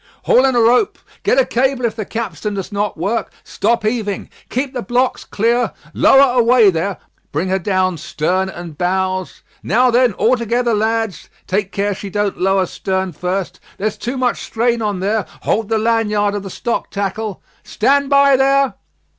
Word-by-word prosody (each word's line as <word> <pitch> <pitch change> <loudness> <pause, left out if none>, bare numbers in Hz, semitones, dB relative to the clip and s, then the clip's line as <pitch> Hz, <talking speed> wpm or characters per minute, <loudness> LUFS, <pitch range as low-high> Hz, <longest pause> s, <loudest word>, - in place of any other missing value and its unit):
"Haul 255 - +4
in 265 -2 +2
a - - +4
rope 245 - +3 0.2
Get 450 +5 +2
a - - +5
cable 260 0 0
if 225 - -1
the 215 -2 -4
capstan 210 -2 -4
does 195 +2 -5
not 205 -2 -2
work 200 +8 -2
Stop 230 +1 0
heaving 215 -3 -2 0.2
Keep 260 +2 -2
the 250 - -3
blocks 250 +2 0
clear 235 +3 0 0.2
Lower 270 -2 +5
away 235 -3 +5
there 180 +2 -2 0.3
Bring 165 +6 -1
her 190 +1 +1
down 185 -2 0
stern 185 +6 -1
and 175 -4 -8
bows 185 0 -1 0.2
Now 245 +5 +3
then, 245 -1 +3
all 235 +7 +2
together, 235 +1 0
lads 220 -2 -1 0.2
Take 195 +1 -1
care 200 +1 -1
she 195 +1 -7
don't 205 -1 -2
lower 195 0 +2
stern 190 +1 -2
first 180 +4 -3 0.2
There's 210 +2 -2
too 245 +3 -4
much 250 -2 0
strain 235 0 0
on 205 -4 -2
there 210 +1 0 0.2
Hold 220 0 0
the 225 - +2
laniard 215 -2 +1
of 205 - -3
the 195 - -7
stock 235 +5 -3
tackle 200 +1 -4 0.2
Stand 280 0 +1
by 280 -1 +5
there!" 275 +1 +3
215 Hz, 175 wpm, -18 LUFS, 195-245 Hz, 0.3 s, a